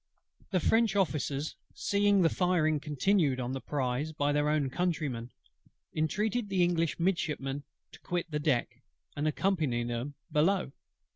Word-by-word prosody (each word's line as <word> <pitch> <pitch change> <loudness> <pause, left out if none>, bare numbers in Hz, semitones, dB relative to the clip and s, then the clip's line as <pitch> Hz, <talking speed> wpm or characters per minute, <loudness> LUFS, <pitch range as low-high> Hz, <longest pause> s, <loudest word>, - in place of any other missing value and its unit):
The 185 - +2
French 225 +4 +3
Officers, 150 -6 0 0.2
seeing 200 -1 +3
the 165 - +5
firing 165 -5 +2
continued 150 -1 +1
on 125 0 -2
the 135 0 -4
prize 140 +1 -1
by 145 -1 +1
their 145 0 +2
own 150 -3 +1
countrymen, 150 -9 -1 0.7
entreated 210 +8 0
the 190 -2 +3
English 170 -2 +1
Midshipmen 150 -6 -1 0.3
to - - -14
quit 175 -1 -3
the 150 - -1
deck, 145 -5 0 0.3
and 145 +2 0
accompany 155 -8 +1
them 120 +4 -4 0.2
below. 165 0 +2
155 Hz, 140 wpm, -30 LUFS, 140-180 Hz, 0.7 s, the